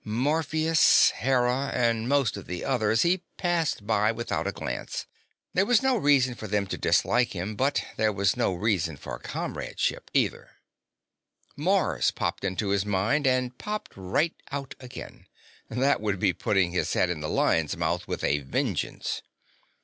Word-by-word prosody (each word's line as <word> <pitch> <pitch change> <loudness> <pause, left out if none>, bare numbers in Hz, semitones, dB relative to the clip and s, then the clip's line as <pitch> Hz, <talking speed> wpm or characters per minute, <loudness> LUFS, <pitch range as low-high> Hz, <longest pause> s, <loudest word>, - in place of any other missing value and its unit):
Morpheus, 155 +7 +3
Hera, 130 +1 +1
and 115 -1 +1
most 140 -5 +2
of 100 - -9
the 90 -1 -4
others 110 -3 +2
he 175 +1 +2 0.2
passed 170 - 0
by 110 0 +2
without 115 +1 -3
a - - 0
glance; - - -5 0.5
there 190 - +3
was 245 +3 +3
no 265 -1 +3
reason 140 - +3
for 110 -2 -8
them 100 0 0
to - - -4
dislike 120 0 +2
him, 95 +3 -4
but 135 +5 +1
there 110 0 +2
was 100 -1 +1
no - - +1
reason 90 -5 0
for - - -7
comradeship, - - -3
either. - - 0 1.0
Mars - - +2
popped - - -3
into 100 +2 -1
his 100 -1 +2
mind, 105 +9 +1
and 125 -1 0
popped 210 0 -4
right 100 - 0 0.2
out 140 -1 -4
again. 125 -1 -10 0.4
That 135 0 +1
would 105 -2 -1
be 90 0 +2
putting 95 -2 +1
his 90 - -1
head 90 - +2
in 85 - -3
the 75 0 -4
lion's 80 -2 +1
mouth - - -1
with - - -4
a 75 - +2
vengeance. 70 -1 -2
115 Hz, 160 wpm, -27 LUFS, 100-140 Hz, 1.0 s, Morpheus